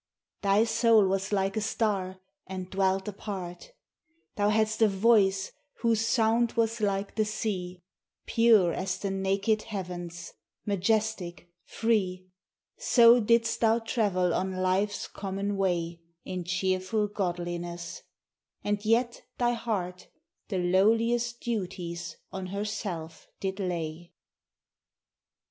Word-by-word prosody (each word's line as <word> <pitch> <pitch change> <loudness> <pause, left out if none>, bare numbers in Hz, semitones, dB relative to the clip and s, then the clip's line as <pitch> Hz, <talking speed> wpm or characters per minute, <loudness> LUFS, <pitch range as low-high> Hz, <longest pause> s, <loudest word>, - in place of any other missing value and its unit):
Thy 200 +2 +4
soul 225 -2 +4
was 195 +1 -1
like 195 0 +1
a 215 - 0
Star, 200 -4 -1 0.3
and 185 -1 -6
dwelt 190 +1 +1
apart: 195 - -6 0.6
Thou 205 0 +2
hadst 215 +1 +1
a 220 - +7
voice 195 -1 +3 0.3
whose 230 -2 +2
sound 230 0 +2
was 230 -1 0
like 200 -1 -1
the 220 - +1
sea: 185 -5 -3 0.4
Pure 220 -7 +4
as 185 0 -2
the 195 0 -3
naked 195 +3 +1
heavens, 175 -5 -6 0.3
majestic, 200 -3 -1
free, 190 -5 0 0.5
So 235 0 +6
didst 230 +1 +2
thou 225 0 +4
travel 200 -6 0
on 190 +1 -1
life's 185 +2 0
common 200 +1 -3
way, 170 -3 -1 0.2
In 180 -2 -4
cheerful 185 +3 0
godliness; 175 -3 -4 0.6
and 205 0 -1
yet 235 +2 +1 0.2
thy 240 -1 +2
heart 190 -7 -3 0.4
The 195 - -2
lowliest 230 +6 +2
duties 180 -6 -4
on 190 -1 -5
herself 195 -5 -5
did 190 0 -3
lay. 170 -2 -4
195 Hz, 115 wpm, -28 LUFS, 185-220 Hz, 0.6 s, a